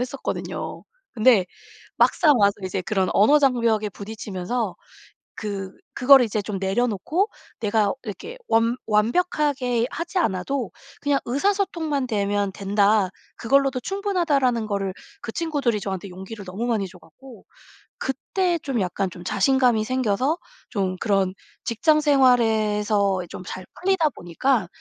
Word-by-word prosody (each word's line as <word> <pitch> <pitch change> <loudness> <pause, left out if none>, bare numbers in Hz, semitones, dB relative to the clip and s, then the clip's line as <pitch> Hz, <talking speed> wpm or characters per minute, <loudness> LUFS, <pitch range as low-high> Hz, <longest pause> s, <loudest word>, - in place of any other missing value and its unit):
했었거든요. 255 +2 -4 0.3
근데 220 -4 +4 0.5
막상 310 -5 +4
와서 200 -1 +5
이제 185 +1 -2
그런 190 0 0
언어 250 +9 +5
장벽에 230 -6 +2
부딪히면서 200 0 -4 0.6
그 200 -3 -4 0.2
그거를 270 0 +7
이제 215 -1 -2
좀 200 0 -4
내려놓고 240 - 0 0.3
'내가 210 -1 +2
이렇게 420 - -7
완 230 +2 +2
완벽하게 250 - +1
하지 340 +3 -4
않아도 225 - -1 0.3
그냥 285 -1 +2
의사소통만 315 -2 0
되면 205 -3 0
된다. 200 0 +2 0.3
그걸로도 275 +1 +2
충분하다.'라는 320 - 0
거를 195 -2 -2 0.3
그 225 - -6
친구들이 285 -9 0
저한테 190 0 -4
용기를 190 +3 -9
너무 190 +6 -4
많이 215 -5 0
줘 180 0 -15
갖고 235 - -16 0.6
그때 345 +6 -1
좀 275 -6 -2
약간 190 +1 -1
좀 175 0 -10
자신감이 250 +2 +2
생겨서 255 +5 0 0.3
좀 190 -4 -1
그런 195 -3 +1 0.3
직장생활에서 225 - +3
좀 - - -8
잘 185 0 -7 0.2
풀리다 365 -4 +2
보니까 215 - -1
230 Hz, 295 characters per minute, -23 LUFS, 200-275 Hz, 0.6 s, 그거를